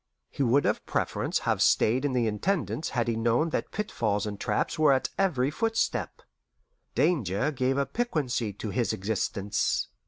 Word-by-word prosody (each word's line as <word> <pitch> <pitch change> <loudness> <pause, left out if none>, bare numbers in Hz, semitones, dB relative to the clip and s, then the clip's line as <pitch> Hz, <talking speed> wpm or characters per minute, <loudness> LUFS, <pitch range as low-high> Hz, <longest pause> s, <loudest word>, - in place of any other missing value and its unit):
He - - -4
would 135 +2 +3
of - - 0
preference - - -1
have - - +1
stayed 125 +6 +3
in 140 - 0
the 125 -2 +2
Intendance 160 - -1
had 120 -3 -1
he 115 - 0
known 120 +8 +1
that - - -2
pitfalls 110 - -1
and 105 -1 -5
traps - - -1
were 155 -2 +5
at 130 - 0
every 145 -9 +1
footstep. 225 +8 -1 0.7
Danger 130 - +1
gave 130 -1 0
a 140 - +2
piquancy 140 - -1
to 105 +1 -5
his 120 0 0
existence. 105 +1 -1
130 Hz, 160 wpm, -28 LUFS, 110-155 Hz, 0.7 s, were